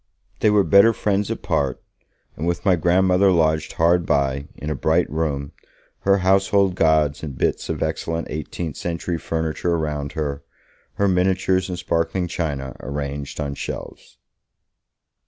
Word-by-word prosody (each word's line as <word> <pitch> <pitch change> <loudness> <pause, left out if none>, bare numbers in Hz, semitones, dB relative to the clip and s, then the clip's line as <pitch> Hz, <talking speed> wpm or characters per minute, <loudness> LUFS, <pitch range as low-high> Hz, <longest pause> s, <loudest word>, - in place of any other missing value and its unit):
They 110 - +4
were 105 -1 +4
better 100 +6 +6
friends 100 -1 0
apart, 70 -2 -1 0.6
with 85 +4 -2
my 95 -2 +5
grandmother 90 +3 +3
lodged 80 -2 +1
hard 85 +1 +3
by, 70 -2 0
in 75 - -5
a - - -1
bright - - +2
room, 75 -3 -2 0.5
her 100 0 +3
household 95 0 +3
gods 80 -4 +2
and 70 -5 -6
bits - - -1
of - - -1
excellent 80 0 -2
eighteenth 80 +1 -5
century 85 0 -3
furniture 80 +2 -1
around 75 -3 -3
her, 70 -3 -3 0.5
her 100 - +2
miniatures 95 0 +1
and 90 - -3
sparkling 85 +1 -1
china 70 -7 -3
arranged 70 +1 -5
on 70 -2 -2
shelves. - - -7
80 Hz, 140 wpm, -22 LUFS, 75-95 Hz, 0.6 s, better